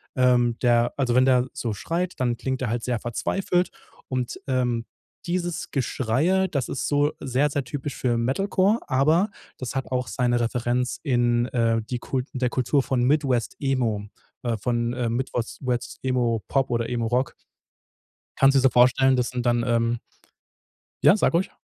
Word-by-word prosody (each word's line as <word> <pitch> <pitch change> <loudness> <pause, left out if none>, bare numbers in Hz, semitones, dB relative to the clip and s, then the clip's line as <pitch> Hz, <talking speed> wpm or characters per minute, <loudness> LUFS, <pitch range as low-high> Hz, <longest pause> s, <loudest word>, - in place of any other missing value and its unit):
Ähm, 125 -2 +3
der 120 -1 +3
also 125 -3 +1
wenn 130 +1 +5
der 130 -1 +3
so 115 -3 -3
schreit, 170 - -2
dann 120 -2 0
klingt 130 -1 -3
der 125 - -1
halt 120 0 -2
sehr 120 -3 -1
verzweifelt 180 - -1 0.4
und, 125 -2 -3
ähm, 125 -3 0 0.4
dieses 175 -1 -3
Geschreie, 140 +9 +1
das 140 -7 -2
ist 130 - -2
so 145 +1 +2
sehr, 135 +3 +1
sehr 140 -1 -2
typisch 140 +2 -5
für 120 -2 0
Metalcore, 195 - +1
aber 155 +9 +3 0.3
das 130 0 -5
hat 135 - -2
auch 125 -2 -1
seine 120 +3 +1
Referenz 120 +1 -1
in, 120 -3 +2
äh 115 -2 +1
die 120 +3 -4
Kult 130 +1 -3
der 125 -2 0
Kultur 135 +1 +1
von 125 -2 0
Midwest 135 -4 +1
Emo, 120 -7 0 0.4
äh, 115 -2 -1
von, 120 +2 -1
äh, 120 -2 -1
Midwost 120 -1 -3
West 125 0 -2
Emo 120 -5 0
Pop 135 -1 +1
oder 115 -1 0
Emo 120 -2 -1
Rock. 125 +3 0 1.0
Kannst 135 0 +5
du - - +6
dir - - 0
so 135 - +6
vorstellen, 130 +2 +4
das 125 -1 0
sind 125 -1 -4
dann, 120 -1 +2
ähm 115 -1 +1 1.1
Ja, 200 - +7
sag 195 - +2
ruhig. 175 +3 +1
125 Hz, 170 wpm, -24 LUFS, 120-135 Hz, 1.1 s, Ja